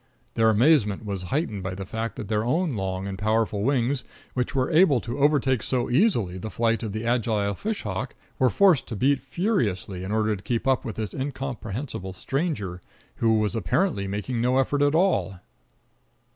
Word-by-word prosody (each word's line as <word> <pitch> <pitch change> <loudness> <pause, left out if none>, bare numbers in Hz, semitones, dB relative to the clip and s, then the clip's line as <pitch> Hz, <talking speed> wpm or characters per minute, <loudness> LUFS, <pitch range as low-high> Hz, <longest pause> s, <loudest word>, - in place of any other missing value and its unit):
Their 110 -1 +3
amazement 110 -3 +3
was 100 -3 -3
heightened 130 - -1
by 95 0 -4
the 95 0 -6
fact 110 +3 -4
that 105 - -6
their 105 0 0
own 155 +4 0
long 95 -1 -3
and 95 -1 -5
powerful 110 -1 +1
wings, 130 +2 +1 0.3
which 125 +2 -2
were 130 -1 +1
able 155 -5 +5
to 120 +3 -5
overtake 135 -4 +3
so 120 0 -1
easily 120 - +2
the 110 - -5
flight 115 +3 0
of 110 -3 -4
the 110 +3 -4
agile 110 -4 +1
fish 215 - -4
hawk, 95 -3 -4 0.2
were 130 - +4
forced 185 - +4
to 115 - -5
beat 135 +6 +2
furiously 105 - -1
in 95 - -4
order 110 0 +1
to 95 - -10
keep 115 +5 -2
up 130 -2 +2
with 110 - -5
this 110 -2 -4
incomprehensible 130 -6 -4
stranger, 105 - -3 0.4
who 110 -1 +3
was 110 +1 0
apparently 105 - 0
making 105 +5 -2
no 125 +2 +2
effort 140 +2 +1
at 145 +1 +3
all. 95 - +1
115 Hz, 185 wpm, -25 LUFS, 100-135 Hz, 0.4 s, able